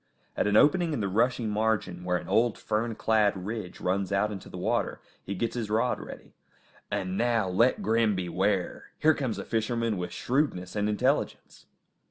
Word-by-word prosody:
At - - +1
an 105 +1 +4
opening 165 +4 +4
in 145 - -2
the 100 - 0
rushy 115 +4 +1
margin, 105 -4 -1
where 90 0 +1
an - - -8
old, 115 0 +2
fern 110 +1 -2
clad 105 -5 +1
ridge 105 -4 -5
runs 95 +1 -1
out 100 +2 +1
into 100 -3 -8
the - - -8
water, - - -1 0.2
he 100 - -4
gets 115 +4 -2
his 115 -4 -3
rod 115 +4 +1
ready. - - -10 0.6
And 95 0 -2
now 115 -4 +2
let 115 +8 +2
Grim 110 0 +2
beware! 95 +1 -1
Here 155 +1 +4
comes 130 -6 -3
a - - -5
fisherman 115 -1 -1
with 90 -1 -4
shrewdness 120 - -1
and 105 0 0
intelligence! 105 -1 -1
105 Hz, 180 wpm, -28 LUFS, 95-115 Hz, 0.6 s, an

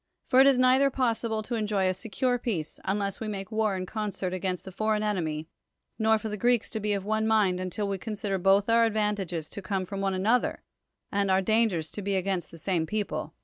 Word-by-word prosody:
For 255 - +4
it 270 - +8
is 275 -2 +5
neither 255 +2 +5
possible 230 -4 -1
to 240 - -5
enjoy 210 -4 +1
a 185 - +2
secure 225 +6 -1
peace, 180 -11 -3
unless 200 0 -1
we 220 - -4
make 200 0 -5
war 215 -2 +1
in 185 - -3
con 210 +2 -3
cert 185 -2 -4
against 185 -1 -2
the 190 - -7
foreign 215 +2 0
enemy, 160 -7 -2 0.5
nor 220 0 +4
for 220 - -5
thr 210 0 -4
Greeks 240 +1 +2
to 220 - -3
be 210 0 0
of 195 -1 -3
one 220 +1 0
mind 205 -5 +3
until 185 +3 -2
we 195 -1 -2
consider 205 -2 -3
both 195 +2 +4
our 230 0 +5
advantages 205 -7 -1
to 200 - -6
come 190 -1 -2
from 195 +2 -5
one 195 -1 0
another, 220 +6 +1 0.5
and 200 -1 +1
our 190 0 +3
dangers 210 -7 +1
to 210 - -6
be 200 0 -1
against 190 -2 -1
the 165 - -11
same 165 -1 -1
people. 215 +2 -3
205 Hz, 225 wpm, -28 LUFS, 190-220 Hz, 0.5 s, it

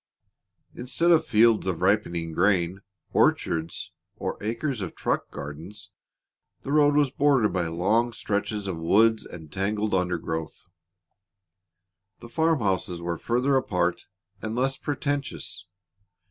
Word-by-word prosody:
Instead 155 +8 +1
of 165 - +4
fields 110 -2 +4
of 90 -2 -2
ripening 85 -4 +1
grain, 90 +1 +1 0.3
orchards, 80 0 +1 0.2
or - - -3
acres 115 +3 -2
of 90 - -5
truck - - -1
gardens, 90 +8 -8 0.7
the 140 - -4
road 145 -1 +4
was 145 -3 +3
bordered 135 -6 +3
by 90 -3 0
long 105 +9 +1
stretches 105 -1 -2
of 95 -4 -3
woods 110 +7 +3
and 80 -3 -11
tangled 105 +2 -1
undergrowth. 85 -3 -2 1.5
The 120 - -11
farm 160 +2 +1
houses 95 -3 -1
were 85 -1 -3
farther 125 +4 +1
apart 90 -9 0 0.3
and 110 0 -3
less 135 +2 +1
pretentious. 145 -1 -3
105 Hz, 120 wpm, -26 LUFS, 90-125 Hz, 1.5 s, of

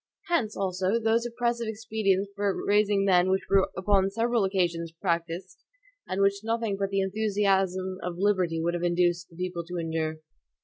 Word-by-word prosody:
Hence, 240 -12 0
also, 190 +2 0
those 230 +1 +1
oppressive 235 -1 -1
expedients 210 -3 -1
for 200 -1 -1
raising 205 -1 +3
men 180 -1 +4
which 190 0 +1
were 195 -1 +4
upon 195 0 +2
several 230 +2 +1
occasions 175 -4 0
practiced, 170 0 -3 0.4
and 195 +1 0
which 200 +1 +1
nothing 225 -2 -1
but 195 0 -2
the 195 0 +1
enthusiasm 190 -2 0
of 180 -1 -4
liberty 185 -4 +1
would 170 +1 0
have 175 - -2
induced 175 0 +1
the 165 - -18
people 180 -1 -4
to 180 +1 -6
endure. 160 -1 -2
195 Hz, 165 wpm, -27 LUFS, 180-210 Hz, 0.4 s, men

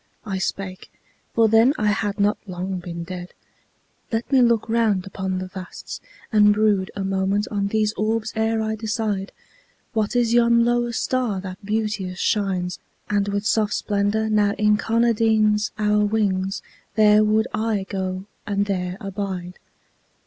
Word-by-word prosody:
I 195 -3 -3
spake 185 0 -4 0.4
for 230 -1 +5
then 225 +6 +5
I 210 -2 +1
had 205 0 -2
not 205 +1 +2
long 185 +1 -4
been 170 -1 -6
dead 180 0 -8 0.8
"Let 225 +3 -2
me 265 -2 +5
look 235 -2 +3
round 220 -5 +1
upon 190 -1 -3
the 185 - -3
vasts, 185 0 -8 0.3
and 210 -1 +5
brood 205 -3 +2
A 200 - -3
moment 195 +2 0
on 200 -1 0
these 215 +1 +1
orbs 220 0 -1
ere 220 0 +1
I 220 0 -1
decide... 210 -2 -2 0.6
What 220 0 0
is 235 -1 +2
yon 235 0 +5
lower 240 0 +1
star 235 -3 -1
that 185 +1 -8
beauteous 210 -3 -2
shines 185 -3 0 0.3
And 200 -1 +1
with 200 +1 -2
soft 215 -1 +2
splendor 205 +1 0
now 210 -2 +2
incarnadines 215 0 +2
Our 210 0 +2
wings? 195 -3 0 0.3
There 215 -1 +6
would 215 +1 +2
I 215 -2 -1
go 185 -1 -3 0.2
and 200 -1 +1
there 185 -2 -2
abide." 190 -3 -5
210 Hz, 150 wpm, -23 LUFS, 195-220 Hz, 0.8 s, There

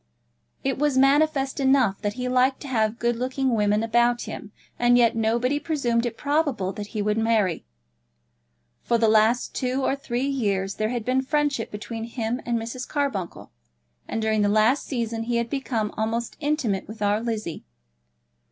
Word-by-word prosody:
It 270 -1 -1
was 295 -2 +1
manifest 275 0 +3
enough 265 -7 +3
that 205 -1 -1
he 250 0 -3
liked 255 +1 +2
to - - -7
have 220 -3 0
good 240 -1 0
looking 260 +1 -1
women 210 0 +2
about 240 +1 +2
him, 210 - -8 0.3
and 245 0 +5
yet 235 -2 +4
nobody 235 +5 +1
presumed 250 -7 0
it 230 - -6
probable 285 -10 0
that 205 0 -6
he 205 - 0
would 210 +1 +1
marry. 215 - +1 1.1
For 235 - +1
the 225 -1 +3
last 220 +3 +3
two 255 +1 -1
or 270 - +1
three 255 -2 -3
years 200 -8 -1
there 215 0 0
had 240 -2 -3
been 255 +1 +2
friendship 285 -3 0
between 225 +2 -6
him 235 +1 -3
and 235 -1 +1
Mrs. 230 +2 -5
Carbuncle; 275 - -3 0.6
and 225 - -3
during 220 -1 +1
the 205 - +3
last 220 +6 +3
season 230 -3 -3
he 240 0 -1
had 235 0 -1
become 235 -6 -2
almost 225 +2 -2
intimate 285 -10 -1
with 215 -1 -6
our 205 +1 +2
Lizzie. 215 -8 -4
235 Hz, 170 wpm, -24 LUFS, 220-265 Hz, 1.1 s, and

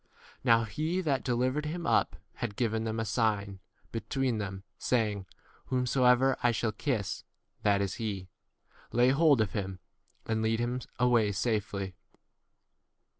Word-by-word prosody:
Now 115 -2 +5
he 155 - -1
that 140 -7 0
delivered 130 +4 0
him 170 +2 -4
up - - +2 0.2
had 110 -4 -3
given 110 -1 0
them 110 0 -2
a 115 - -1
sign 100 -3 0 0.3
between 115 +1 -1
them, 95 -1 -5 0.2
saying, 105 -6 0 0.4
Whomsoever 125 0 +3
I 120 - +4
shall 115 -1 0
kiss, 110 -2 -2 0.4
that 100 -1 +3
is 100 - -1
he; 100 -4 -3 0.6
lay 120 +2 +4
hold 140 -2 +5
of 105 -4 0
him, 95 -2 -3 0.5
and 110 -1 0
45 - - -1
lead 110 +1 +1
him 120 +1 -1 0.2
away 120 -4 +3
safely. 100 -3 -1
115 Hz, 140 wpm, -30 LUFS, 105-125 Hz, 0.6 s, Now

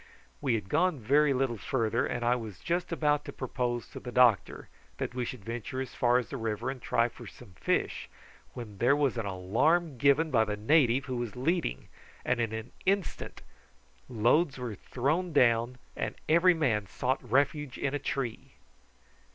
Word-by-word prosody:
We 130 -5 +1
had 105 -4 -4
gone 180 - +2
very 140 +6 +3
little 130 -3 0
farther, 115 -2 0
and 120 -1 -3
I 120 +1 +4
was 110 -6 -6
just 175 +1 -2
about 150 -3 +1
to - - -6
propose 120 -2 -3
to - - -8
the 125 - -7
doctor 120 -6 +3 0.3
that - - -3
we 125 -1 -2
should 115 -5 -7
venture 120 +3 -5
as 130 0 -5
far 125 -2 +3
as 125 - -2
the 140 - -5
river 115 +2 -2
and 130 -2 -9
try 115 0 +2
for - - -12
some 120 -6 -13
fish, - - -1 0.5
when 105 -5 -8
there 125 +4 +4
was 145 -3 +1
an 110 - -3
alarm 125 - +1
given 145 +4 +3
by 115 -4 +4
the 105 -1 -3
native 130 +2 +3
who 130 -2 -3
was 120 -3 -4
leading, 150 - -1 0.4
and 120 - +1
in 115 -2 -1
an 110 +1 -6 0.2
instant 195 -3 -1 0.7
loads 130 +7 +2
were 125 -3 -4
thrown 150 - -2
down 120 -2 +3 0.2
and - - -3
every 170 +3 +5
man 115 -10 0
sought 130 +7 -1
refuge 140 +2 0
in 140 - -2
a 145 - -1
tree. 135 -5 -4
125 Hz, 180 wpm, -29 LUFS, 115-145 Hz, 0.7 s, every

